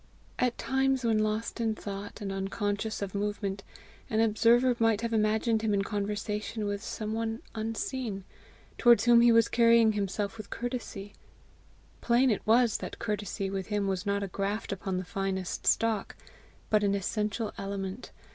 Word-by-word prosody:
At 250 -1 +1
times, 265 -1 +1
when 220 -2 +3
lost 215 +2 -1
in 220 -1 0
thought 200 0 -7
and 200 -1 -3
unconscious 205 +2 -2
of 195 - -5
movement, 200 -1 -2 0.5
an 220 - 0
observer 235 +3 +4
might 225 -2 +3
have 230 0 -2
imagined 220 +1 +2
him 215 -2 +1
in 195 - +1
conversation 210 +1 -3
with 205 0 -2
some 215 -1 -4
one 225 0 -3
unseen, 225 -1 -3 0.6
towards 235 -4 +6
whom 240 -1 +7
he 240 0 +6
was 230 0 +5
carrying 230 -1 +5
himself 205 +1 -2
with 210 - -8
courtesy: 235 -5 -5 0.9
plain 245 +2 +3
it 210 - 0
was 230 0 +4
that - - -6
courtesy 205 -3 -3
with 195 -1 -3
him 210 -1 0
was 190 -1 -1
not 200 -1 0
a - - -2
graft 200 +3 -3
upon 195 -1 -3
the 185 - -3
finest 190 0 -3
stock, 225 -3 +1 0.6
but 210 -1 +4
an 200 0 +2
essential 210 +2 -2
element. 195 +2 -5
215 Hz, 160 wpm, -29 LUFS, 200-230 Hz, 0.9 s, whom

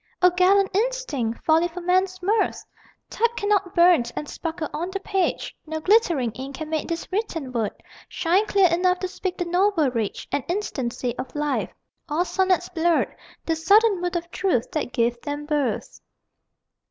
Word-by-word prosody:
O 360 0 +5
gallant 380 +2 +3
instinct, 410 - -1
folly 325 +2 +4
for 350 +1 -8
men's 370 +1 +1
mirth! 425 +4 +1 0.5
Type 470 +1 +2
cannot 405 -3 0
burn 345 -6 +6
and 300 - -4
sparkle 325 0 -4
on 340 +4 -3
the 390 +1 -4
page. 390 -1 -1
No 315 0 -3
glittering 335 - +3
ink 265 +4 -7
can 315 +2 -6
make 315 -1 -1
this 335 -1 -4
written 355 - -2
word 230 -4 0 0.4
Shine 370 +5 +1
clear 395 -2 +4
enough 360 +1 +2
to 370 - -1
speak 365 0 -4
the 355 - -2
noble 355 -5 +2
rage 225 -4 -3
And 280 - 0
instancy 260 - -2
of 260 - -6
life. 295 0 -1 0.4
All 320 +4 +1
sonnets 370 -1 +1
blurred 340 -1 +1 0.3
The 325 - +1
sudden 405 +3 +4
mood 355 0 -2
of 340 0 -3
truth 360 -12 0
that 305 -5 -2
gave 240 -1 0
them 290 0 -4
birth. 290 -6 -2
345 Hz, 165 wpm, -24 LUFS, 295-380 Hz, 0.5 s, burn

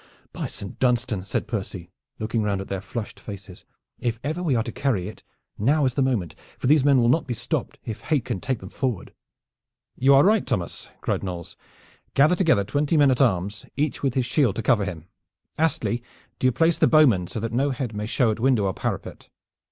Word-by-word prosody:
"By - - -3
Saint 100 -1 -8
Dunstan," 120 -5 +1
said - - -2
Percy, 95 -6 -5 0.3
looking 110 +1 -1
round 100 -2 0
at 95 - -7
their 95 -1 -3
flushed 105 +3 -6
faces, 100 -2 -10 0.3
"if 115 -2 -2
ever 155 +5 -2
we 155 -7 +1
are 115 - +2
to 120 - -5
carry 115 -11 -1
it 105 - -9 0.4
now 140 +7 +3
is 130 - +1
the 140 - 0
moment, 120 - 0 0.2
for - - -6
these 145 +1 +5
men 140 -2 +5
will 120 - +3
not 145 +6 +2
be 120 - -2
stopped - - -3
if 110 - -5
hate 145 -7 0
can 120 -6 -3
take 130 -4 -2
them 95 - -8
forward." 125 -8 -3 0.8
"You 135 +2 +5
are 135 - +7
right, 215 +1 +4
Thomas!" 90 -4 -3
cried - - -1
Knolles. 90 -3 -6 0.6
"Gather 150 +6 +5
together 165 - +3
twenty 145 +9 0
men 145 -2 +6
at 130 - +1
arms 100 -4 0
each 150 0 -1
with 135 -3 0
his 130 -2 +1
shield 120 - +2
to 115 - -3
cover 105 -4 +3
him. 85 -4 -6 0.5
Astley, 140 -6 0 0.4
do 130 - +3
you - - +4
place 165 +5 +2
the - - +5
bowmen 125 - +5
so 110 - -5
that 115 +1 -3
no 135 +4 +2
head 130 -3 -3
may 105 +1 -3
show 115 -1 +2
at 110 - -4
window 120 -4 +3
or 95 - 0
parapet. - - -5
120 Hz, 215 wpm, -24 LUFS, 100-140 Hz, 0.8 s, are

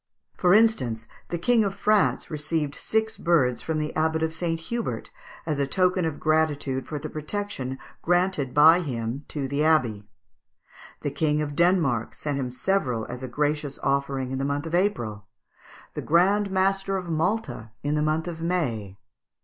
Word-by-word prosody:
For 180 +1 +4
instance, 130 - +2 0.2
the 175 - -2
King 225 +6 +3
of 200 -1 -2
France 210 -4 +2
received 150 -1 -2
six 220 +5 -1
birds 135 -8 +2
from 160 -1 -2
the 150 0 -3
Abbot 160 0 +1
of 160 0 -1
St. 165 -1 -2
Hubert 235 +8 -4 0.3
as 150 -3 -1
a 140 - +1
token 180 +2 +2
of 160 -2 -3
gratitude 145 -4 0
for 150 - -4
the 150 +2 -5
protection 155 -4 -4 0.2
granted 175 -6 +1
by 160 +5 +7
him 130 -3 -4
to 140 -3 -3
the 140 +2 0
abbey. 120 -10 +2 0.9
The 145 - -2
King 150 +1 +1
of 145 -1 -3
Denmark 165 -9 +2
sent 145 -2 -3
him 130 -2 -2
several 125 - 0
as 125 +1 -6
a 130 - -4
gracious 145 +2 -1
offering 135 -1 0
in 130 - -2
the - - -1
month 145 +2 -1
of 165 - -6
April; 120 - 0 0.7
the - - -4
Grand 195 +5 +3
Master 195 0 +1
of 180 -2 -5
Malta 165 - -1
in 145 +1 0
the 150 - +1
month 155 +2 0
of 165 -2 -5
May. 120 - -2
155 Hz, 170 wpm, -25 LUFS, 135-180 Hz, 0.9 s, by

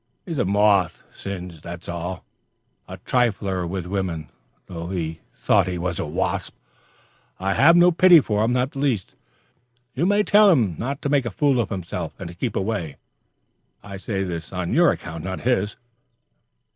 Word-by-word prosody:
He 175 - -7
is 155 - -2
a 120 - +2
moth 100 -2 +2
singed, 90 -5 -7
that 85 +1 -8
is - - -15
all 85 +1 -5 0.6
the - - -7
trifler 100 -7 0
with 90 0 -4
women 90 -5 -3 0.4
thought 85 -2 -1
he 90 -1 -2
was 90 +1 -3
a 80 - -2
wasp. 75 - -2 0.8
I 95 +1 0
have 165 +9 +6
no 175 +1 +6
pity 175 0 +7
for 105 -6 0
him, 115 - +1
not 125 +2 0
the 135 - -7
least. 125 -10 -1 0.8
You 170 +7 0
may 205 +1 +3
tell 210 0 +6
him 115 - +3
not 135 +4 -4
to 140 - -1
make 140 -4 +2
a - - -1
fool 135 +5 +1
of 115 - 0
himself, 95 -5 -5
and - - -7
to - - -9
keep 110 +5 -3
away. 95 -7 -2 0.9
I 100 -1 -8
say 95 0 -3
this 85 -3 -5
on 90 -2 -3
your 170 +2 +5
account, 80 -2 -4
not 95 0 -4
his. 105 -5 0
100 Hz, 175 wpm, -23 LUFS, 90-130 Hz, 0.9 s, pity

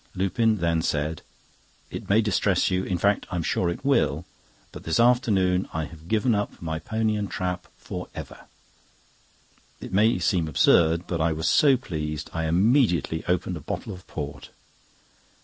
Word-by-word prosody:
Lupin 105 +4 +1
then 85 -2 +1
said: 75 0 -2 0.7
"It - - -7
may 105 +3 +5
distress 100 -2 +1
you—in 90 0 0
fact, 100 +3 +1
I'm 90 -3 -2
sure 85 +2 0
it 85 - -5
will—but 90 - -2
this 80 0 0
afternoon 105 -7 +3
I 80 - -1
have 80 0 -13
given 110 +3 +2
up 105 -1 -2
my 80 -1 -4
pony 110 +3 -1
and 105 -2 -3
trap 90 -1 -3
for - - -7
ever." - - -9 1.3
It - - -9
may 105 +3 +4
seem 90 -2 +1
absurd, 80 +3 +3
but 85 -2 -2
I 80 0 +2
was 80 +2 -2
so 140 -3 +5
pleased, 75 - -5
I 80 0 -2
immediately 90 - +2
opened 90 0 -1
a - - -9
bottle - - -5
of 90 -1 -13
port. 70 -1 -7
90 Hz, 155 wpm, -25 LUFS, 80-105 Hz, 1.3 s, may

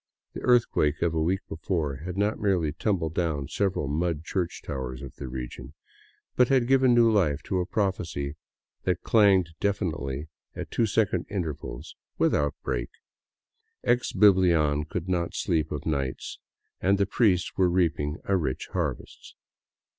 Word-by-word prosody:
The - - -6
earthquake 110 - +2
of 85 - +1
a 80 - 0
week 95 +5 +1
before 80 -4 -2
had 90 +5 -6
not 105 +2 +1
merely 95 -8 +1
tumbled 85 -2 -1
down 80 -6 -1
several 95 -7 0
mud 80 +2 -1
church 90 -1 -3
towers 65 0 -5
of 65 - -8
the 70 - -6
region, 65 +3 -7 0.6
but 125 - +5
had 130 -2 +3
given 130 -1 +4
new 115 -1 +5
life 80 -9 +1
to 95 - -1
a 90 - -1
prophesy 90 -9 -2 0.5
that 90 -1 -1
clanged 100 -6 +4
deafeningly 80 -8 -2 0.3
at - - -6
two 115 - +2
se*cond 100 -4 +1
intervals 80 -10 -5 0.2
without 75 -1 +2
a - - -56
break, - - -2 0.9
ex 120 +1 +1
Biblian 85 -7 +4
could 85 +2 -4
not 85 -2 -1
sleep 80 -4 0
of 75 -1 -4
nights 70 -4 -3 0.4
and 100 +2 +3
the 100 - +2
priests 95 -3 +1
were 95 -2 +3
reaping 80 -4 0
a 100 - +1
rich 75 -8 -2
harvest. - - -4
85 Hz, 155 wpm, -27 LUFS, 75-100 Hz, 0.9 s, but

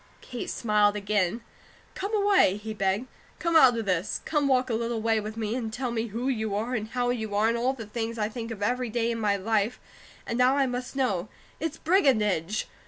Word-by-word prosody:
Kate 245 -2 -6
smiled 210 -2 +2
again. 205 +1 0 0.5
"Come 395 +2 -4
away," 400 - +4
he 220 +1 -6
begged. 195 +3 0 0.3
"Come 335 -1 -1
out 260 -7 +7
of 225 - -2
this. 185 0 -1
Come 295 -3 +1
walk 255 -2 +2
a - - 0
little 230 0 -1
way 225 0 +2
with 215 +1 -6
me, 220 -1 -2
and 235 -3 -3
tell 245 +2 -3
me 230 0 -1
WHO 230 +4 -3
you 220 -6 -1
are, 225 +5 -2
and 220 -3 -2
HOW 245 +1 0
you 220 -4 -3
are, 210 +2 +3
and 230 - +1
all 245 +3 +1
the 230 -4 -8
things 230 +2 -4
I 210 -1 0
think 230 +1 -6
of 215 -3 -5
every 250 +2 0
day 235 +1 0
of 230 - -3
my 205 -2 +2
life, 215 +3 0 0.5
and 235 - -3
now 255 +2 +4
I 275 - +3
must 250 +1 -4
know. 210 -8 0 0.3
It's 320 0 -3
brigandage! 215 - +2
230 Hz, 220 wpm, -27 LUFS, 210-250 Hz, 0.5 s, out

